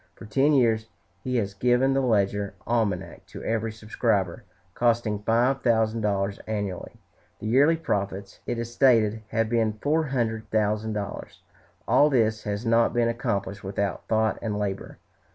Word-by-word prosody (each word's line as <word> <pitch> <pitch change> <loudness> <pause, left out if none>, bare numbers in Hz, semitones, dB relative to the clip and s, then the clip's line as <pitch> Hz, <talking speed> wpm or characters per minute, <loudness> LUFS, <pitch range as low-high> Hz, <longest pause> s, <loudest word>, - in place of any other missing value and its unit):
For - - -11
ten 135 +8 +2
years 115 -5 +2 0.4
he 125 0 -2
has 100 -4 0
given 125 +5 +2
the 135 - +2
"Ledger 100 -4 0
Almanac" 115 -3 -2
to - - -10
every 115 0 -1
subscriber, 105 -2 -1 0.3
costing 115 -3 +1
five 120 +5 +2
thousand 115 -1 +2
dollars 100 -1 -1
annually. 100 -4 -4 0.5
The - - -8
yearly 140 +9 +4
profits, 100 -9 -3
it 120 - -2
is 115 0 -5
stated, 115 -4 +3
have 115 +1 0
been 110 -1 +1
four 150 +9 0
hundred 115 -5 -2
thousand 110 0 0
dollars. 105 -1 -6 0.4
All 150 - +5
this 110 -5 +1
has 105 +2 -3
not 115 +1 +3
been 120 -1 +2
accomplished 100 -4 -3
without 100 -1 -3
thought 110 0 +1
and 105 -2 -2
labor. 100 -2 -4
110 Hz, 155 wpm, -26 LUFS, 105-120 Hz, 0.5 s, All